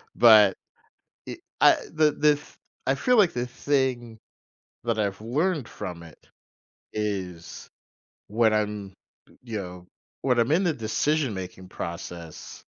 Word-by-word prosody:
But, 110 -5 +7 0.7
I - - -6 0.2
I - - +7 0.2
the 155 -1 +4
the 150 0 +3
th 145 - -14 0.3
I 135 - +3
feel 250 - +2
like 195 -5 +5
the 125 0 -2
thing 125 -3 -1 0.7
that 115 -2 0
I've 100 -1 -1
learned 145 +4 0
from 90 -4 -7
it, 80 -2 -14 0.8
is 95 -5 -4 0.6
when 110 +1 +2
I'm, 105 -2 -2 0.5
you 115 -3 -5
know, 90 -1 -9 0.3
when 125 -3 +2
I'm 115 +5 +2
in 180 +5 +3
the 165 - +2
decision-making 110 -7 -2
process 85 -2 -8
110 Hz, 125 wpm, -26 LUFS, 95-135 Hz, 0.8 s, But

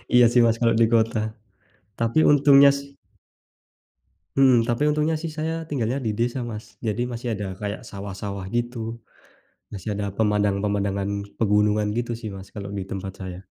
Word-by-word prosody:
Iya, 120 -1 +8
sih, 120 - +5
Mas, 115 0 +2
kalau 115 -1 +4
di 115 - +5
kota, 110 -1 +1 0.7
tapi 115 +7 +3
untungnya, 140 -1 +7
sih 140 0 -7 1.4
Hmm, 130 -4 +5
tapi 120 +4 0
untungnya, 155 +2 +1
sih, 160 0 -4
saya 160 +1 -3
tinggalnya 130 -5 -2
di 110 - +1
desa, 120 +1 0
Mas, 110 -2 -8
jadi 110 +2 -1
masih 120 +1 -5
ada 105 -1 -4
kayak 105 0 -5
sawah-sawah, 100 0 -6
gitu, 120 -1 -3 0.7
masih 100 +1 -7
ada 100 -1 -3
pemandangan-pemandangan 100 -1 0 0.3
pegunungan, 105 0 +2
gitu, 120 0 -1
sih, 110 - -5
Mas, 95 0 -11
kalau 100 -1 -6
di 100 -2 -4
tempat 95 0 -6
saya. 95 0 -8
110 Hz, 155 wpm, -24 LUFS, 100-125 Hz, 1.4 s, Iya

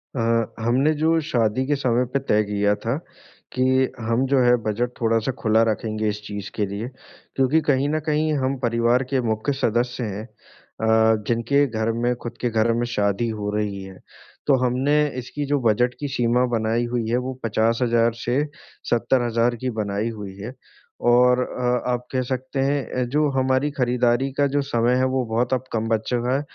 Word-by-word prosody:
अ, 115 -2 0
हमने 130 +6 +3
जो 160 +2 +2
शादी 120 -2 +1
के 145 - +2
समय 125 -2 +1
पे 140 - +2
तय 110 -5 +1
किया 105 0 +1
था 115 +5 0 0.6
कि 130 - +1 0.4
हम 115 +3 0
जो 135 0 +3
हैं 120 -1 +4
बज़ट 110 +3 -1
थोड़ा-सा 115 +2 +1
खुला 110 0 +3
रखेंगे 110 0 -2
इस 105 0 -4
चीज़ 100 -1 -6
के 105 - 0
लिए, 100 +4 -5 0.5
क्योंकि 135 +4 +3
कहीं 140 +1 +2
न 155 +1 0
कहीं 155 0 +1
हम 135 +1 0
परिवार 120 +2 +2
के 130 - +2
मुख्य 110 +6 -1
सदस्य 120 +2 0
हैं 105 -1 -4 0.6
अ, 110 0 +4
जिनके 120 +5 +2
घर 110 -2 -1
में 120 0 +2
ख़ुद 120 0 -6
के 120 - +1
घर 110 +1 +2
में 120 +1 0
शादी 100 +3 0
हो 105 -2 -3
रही 100 -2 -2
है। 95 -1 -11 0.5
तो 140 - +5
हमने 130 +4 +1 0.2
इसकी 130 +4 -4
जो 145 0 +1
बज़ट 120 +3 +2
की 145 - -3
सीमा 120 +1 +2
बनाई 115 +2 0
हुई 115 -2 -1
हैं 120 - +2
वो 130 - -3
50,000 115 +1 +2
से 130 +5 +1 0.5
70,000 120 0 +1
की - - +1
बनाई 100 +2 -2
हुई 105 -4 -7
है। 110 +6 -7 0.6
और 125 +1 +5
अ, 125 0 -1
आप 125 0 -2
कह 130 - 0
सकते 130 +1 -4
हैं 140 +1 +1 0.2
अ, - - +2
जो 150 +5 +1
हमारी 130 +2 +2
खरीदारी 125 -1 +1
का 145 - +3
जो 145 - +3
समय 120 -3 +1
है। 130 - +2
वो 130 -1 +1
बहुत 120 +3 +1
अब 130 -1 0
कम 115 0 -1
बच 110 -1 +1
चुका 125 +1 0
है 140 - 0
120 Hz, 190 wpm, -23 LUFS, 110-130 Hz, 0.6 s, तो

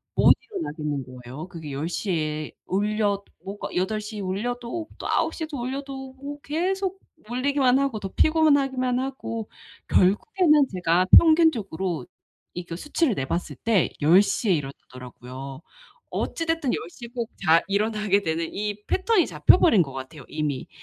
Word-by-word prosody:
못 - - +7
일어나겠는 150 - -4 0.2
거예요. 140 +8 -8
그게 160 -5 -8
10 145 +4 -3
시에 155 -5 -2
울려 205 0 0 0.2
뭐가 200 +2 -6
8 190 +4 0
시에 210 0 -7
울려도 240 - -3
또 - - -4
9 - - +1
시에도 315 -4 -5
올려도 265 +1 -5
뭐 280 +2 -8
계속 380 +5 -2 0.3
울리기만 260 +1 +2
하고 270 -6 -1
더 195 - -5
피곤하기만 270 -4 +2
하고 255 -4 -4 0.4
결국에는 300 - +3
제가 180 0 +2
평균적으로 225 - +3 0.5
이 175 0 -6
그 170 - -6
수치를 295 - 0
내봤을 150 +5 -3
때 220 -6 +1
10 165 +6 +7
시에 205 +1 0
일어나더라고요. 130 -1 -7 0.5
어찌됐든 325 -5 -1
10 - - -1
시에 235 +6 -10
꼭 235 -3 -3 0.2
잘 165 +1 +5
일어나게 210 0 +1
되는 165 -2 -2
이 210 0 -3
패턴이 380 0 +2
잡혀 - - +5
버린 220 - +5
것 135 -4 -3
같아요 135 +2 -8
이미. 150 -3 -3
210 Hz, 295 characters per minute, -25 LUFS, 165-275 Hz, 0.5 s, 못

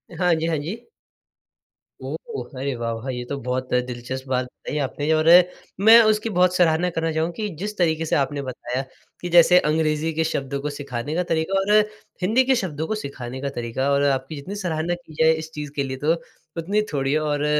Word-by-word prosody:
हाँ 180 0 +2
जी, 160 +1 -2
हाँ 160 -2 0
जी। 185 +11 -6 1.2
ओह, 470 -3 -6
अरे 140 0 -1
वाह, 115 0 -3
वाह! 115 +4 -6
ये 125 -1 -3
तो 140 - -2
बहुत 125 +1 -3 0.2
दिलचस्प 125 +2 -6
बात 130 -1 +1
बताई 140 +3 -7
आपने 145 +3 -1
और 155 +1 +2 0.6
मैं 230 +1 +10
उसकी 215 +1 +1
बहुत 180 0 +4
सराहना 175 0 +3
करना 165 0 0
चाहूँगा 160 +2 0
कि 215 -1 -2
जिस 210 0 -4
तरीक़े 160 -2 +1
से - - 0
आपने 140 0 0
बताया 125 +1 -4 0.4
कि 175 - -4
जैसे 180 +1 +8
अंग्रेजी 155 0 +1
के 160 +1 +1
शब्दों 140 -3 -2
को 150 - -2
सिखाने 140 +1 -4
का 180 - +1
तरीक़ा 160 +4 0
और 195 +2 0 0.5
हिंदी 225 +8 +3
के 265 0 +3
शब्दों 160 -8 -3
को 220 - -1
सिखाने 130 - -6
का 140 - -2
तरीक़ा 120 +3 -2
और 140 0 +3
आपकी 135 +2 0
जितनी 165 +9 -7
सराहना 175 -3 -2
की 170 -2 -16
जाए 160 - +6
इस 160 0 -6
चीज़ 150 -2 -6
के 140 - 0
लिए 130 -1 -4
तो 160 - +4 0.4
उतनी 200 +6 +1
थोड़ी 135 0 0
है 155 - +3
और 150 -1 -1
155 Hz, 205 wpm, -23 LUFS, 135-175 Hz, 1.2 s, मैं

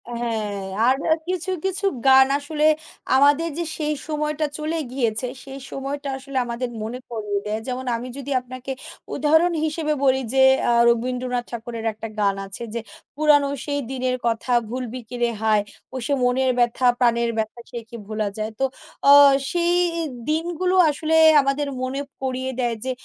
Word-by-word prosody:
হ্যাঁ। 220 -4 -3 0.2
আর 255 +2 +4 0.3
কিছু, 365 0 -2
কিছু 385 +1 0 0.2
গান 265 0 +7
আসলে 300 +1 -1 0.5
আমাদের 290 +4 +4
যে 340 - -1
সেই 305 -1 -1
সময়টা 300 0 -1
চলে 310 +2 -2
গিয়েছে 240 -2 0 0.2
সেই 275 0 -9
সময়টা 280 +1 -4
আসলে 270 0 -6
আমাদের 240 +1 -3
মনে 235 +3 -5
করিয়ে 210 -3 -2
দেয় 210 +1 -2
যেমন 255 0 -4
আমি 235 +2 -5
যদি 280 0 -6
আপনাকে 255 +1 -8 0.4
উদাহরণ 320 +5 +3
হিসেবে 305 0 -1
বলি 265 -1 +3
যে 265 - +4 0.3
আ - - +4 0.2
রবীন্দ্রনাথ 250 +1 -1
ঠাকুরের 230 -1 -6
একটা 220 +1 -7
গান 200 -1 +2
আছে 195 +4 -6
যে, 235 - -2 0.4
"পুরানো 295 -1 +4 0.2
সেই 285 -1 -1
দিনের 255 -1 -1
কথা 230 +2 -1 0.2
ভুলবি 250 0 -4
কিরে 240 -1 0
হায় 215 -2 +3 0.3
ও - - -7
সে 285 - 0
মনের 255 +1 +2
ব্যথা 240 +1 +2
প্রাণের 235 -1 +2
ব্যথা 220 +2 -3
সে 240 - -5
কি 235 - -9
ভোলা 215 -1 -2
যায়।" 215 +1 -3
তো 270 - +3 0.4
আ - - +10 0.4
সেই 345 0 +1 0.6
দিনগুলো 345 +3 0
আসলে 310 +2 0 0.3
আমাদের 275 +1 -1
মনে 260 +2 -2 0.2
পড়িয়ে 260 0 -2
দেয় 240 -2 0
যে 260 - 0
260 Hz, 160 wpm, -22 LUFS, 235-290 Hz, 0.6 s, আ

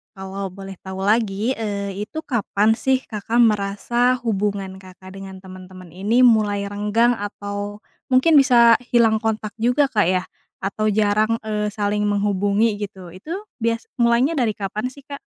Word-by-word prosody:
kalau 190 +1 -5
boleh 195 0 -9
tahu 190 0 -6
lagi, 215 +2 +1
eee, 200 -2 -3
itu 315 +8 -6
kapan 220 -5 +1
sih 265 0 +1
Kakak 225 +2 -2
merasa 225 +3 +2
hubungan 200 -3 -2
Kakak 185 0 -14
dengan 190 -1 -9
teman-teman 185 -1 -12
ini 205 +8 +1
mulai 210 -4 +3
renggang 210 +4 +1
atau, 205 0 -6 0.3
mungkin 260 +6 +4
bisa 235 -4 +6 0.2
hilang 225 -2 +4
kontak 220 -1 -2
juga 245 +5 +2
Kak 210 -7 +2
ya, 185 0 +1 0.4
atau 215 +2 -1
jarang, 215 +2 +2
eee, 210 -1 -2
saling 210 0 -1
menghubungi, 205 +1 +1
gitu, 190 -3 -7
itu 250 - -7 0.3
bias 230 0 -1
mulainya 235 +6 +3
dari 235 -5 +1
kapan 210 +4 -3
sih, 280 +1 -15
Kak? 285 -1 -8
210 Hz, 150 wpm, -21 LUFS, 195-230 Hz, 0.4 s, bisa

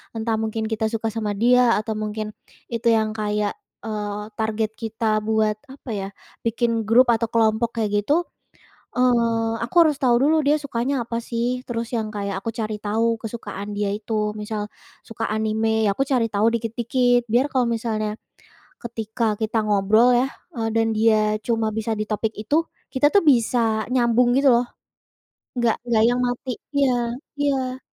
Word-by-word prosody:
Entah 225 0 -1
mungkin 220 0 -2
kita 220 0 -1
suka 225 -1 -2
sama 215 -2 -1
dia 240 +3 +4
atau 220 +1 -3
mungkin, 215 0 -3 0.5
itu 230 0 -1
yang 220 0 0
kayak 210 -1 -1 0.3
eee, 210 -1 -3 0.2
target 220 0 -1
kita 225 +1 -4 0.2
buat 215 -1 +2
apa 270 -2 -12
ya? 195 -1 -3 0.4
Bikin 230 +1 +1 0.2
grup 245 +4 +6
atau 230 - 0
kelompok 230 +1 +1
kayak 215 - 0
gitu, 285 - +1 0.8
eee, 230 -2 +2
aku 240 - -9
harus 305 -3 +2
tahu 250 -3 +4
dulu, 305 +3 +4
dia 295 +1 +4
sukanya 260 0 -1
apa 230 0 -3
sih. 240 +2 -2
Terus 230 0 -4
yang 220 -1 -2
kayak 200 -1 -3
aku 210 - -6
cari 215 -2 -3
tahu 225 +2 0
kesukaan 215 -3 -6
dia 205 -1 0
itu 210 0 -2
misal 210 0 -3 0.4
suka 225 0 -5
anime, 220 0 +1
ya 205 - +3
aku 235 - -1
cari 250 -4 +2
tahu 205 +1 +2
dikit-dikit 240 +2 +1
biar 250 +4 +4
kalau 255 -2 +2
misalnya, 220 -2 -2 0.6
ketika 225 0 -5 0.2
kita 220 +1 0
ngobrol 210 +4 +4
ya, 250 +2 +3 0.3
eee, 225 -1 -1
dan 225 0 +3
dia 215 -1 +3
cuma 225 -2 0
bisa 220 +1 -2
di 215 - -1
topik 215 +1 -1
itu 215 +7 -1 0.4
kita 270 +2 +4
tuh 405 - +6
bisa 240 0 +2 0.3
nyambung 240 -1 +3
gitu 280 +1 +3
loh, 240 +1 +2 0.9
enggak 235 -2 +2
enggak 225 -2 +3
yang 245 - 0
mati 245 +1 -3 0.2
iya 280 -2 +3 0.5
iya. 265 -3 -1
225 Hz, 165 wpm, -23 LUFS, 215-240 Hz, 0.9 s, grup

